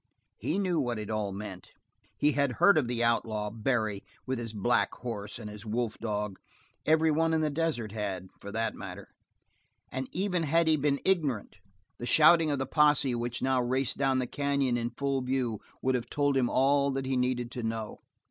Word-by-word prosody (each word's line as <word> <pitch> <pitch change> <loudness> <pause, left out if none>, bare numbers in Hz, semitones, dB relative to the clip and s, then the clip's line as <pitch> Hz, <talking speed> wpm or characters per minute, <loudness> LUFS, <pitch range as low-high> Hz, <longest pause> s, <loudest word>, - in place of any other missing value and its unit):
He 165 - -1
knew 185 -5 +1
what 120 -4 -1
it 105 0 -5
all 105 -2 -1
meant. 95 -2 -7 0.5
He 150 - +3
had 140 -3 +1
heard 200 - +5
of 145 -6 +2
the 120 -1 0
outlaw, 110 -3 0
Barry, 110 -3 -1 0.2
with 130 -1 -2
his 115 -2 -4
black 110 +3 +1
horse 105 -4 -5
and 115 -3 -7
his 105 0 -8
wolf 115 0 -2
dog 105 -3 -3 0.5
everyone 160 +1 +3
in 160 - +2
the 155 -1 +1
desert 145 -8 -1
had, 100 -4 -4
for 100 - -8
that 115 +2 -1
matter - - -8 0.8
and 130 0 -4
even 185 0 0
had 165 +2 +2
he 160 - +5
been 140 -1 +1
ignorant 145 - 0 0.4
the 120 - -4
shouting 160 +2 +6
of 145 - 0
the 135 - -1
posse 145 -2 +3
which 120 +1 -3
now 130 -1 +2
raced 130 +1 -1
down 135 -1 +2
the 130 - 0
canyon 140 -1 0
in 120 0 -1
full 135 +2 -1
view 125 -4 -1 0.2
would 130 - +2
have 125 -2 -2
told 145 -1 +1
him 125 -2 +2
all 140 +2 +3
that 135 0 -2
he 130 0 0
needed 125 -1 0
to 125 - -5
know. 110 -1 -4
125 Hz, 195 wpm, -29 LUFS, 115-145 Hz, 0.8 s, shouting